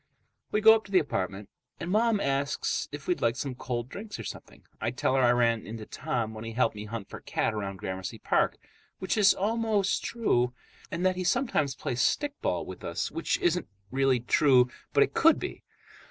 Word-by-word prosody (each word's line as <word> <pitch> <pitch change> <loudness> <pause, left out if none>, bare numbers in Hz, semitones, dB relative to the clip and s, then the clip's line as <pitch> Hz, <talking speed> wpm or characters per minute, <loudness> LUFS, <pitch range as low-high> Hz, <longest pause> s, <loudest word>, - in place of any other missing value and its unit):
We 210 - +1
go 220 +1 +9
up 220 -1 +1
to 195 - -13
the 190 - +5
apartment, 100 - -1 0.3
and 170 +1 -4
Mom 220 +1 +3
asks 140 -2 -1
if 145 0 -7
we'd 180 - 0
like 115 0 +2
some 135 0 -3
cold 120 -1 -4
drinks 205 +9 -7
or - - -6
something. - - -9 0.2
I - - 0
tell 125 +1 0
her 135 - +3
I 125 - +5
ran 115 -2 +2
into 110 0 -6
Tom 110 0 -3
when 110 0 -7
he 115 0 -6
helped 115 -2 +1
me 105 0 -6
hunt 110 -2 -6
for - - -9
Cat - - -1
around 100 -2 -4
Gramercy 95 0 -5
Park, - - +1 0.4
which 190 - -1
is 205 -2 +5
almost 215 -1 +1
true, 125 - +1 0.3
and 170 +2 -2
that 185 -1 +2
he 185 - -1
sometimes 180 - +1
plays 125 -1 -2
stickball 290 - 0
with - - -9
us, - - -3
which 335 - 0
isn't 175 +1 +1 0.2
really 135 -1 +2
true 125 0 +4 0.2
but - - +5
it - - -3
could - - +5
be. - - -6
135 Hz, 200 wpm, -28 LUFS, 115-195 Hz, 0.4 s, go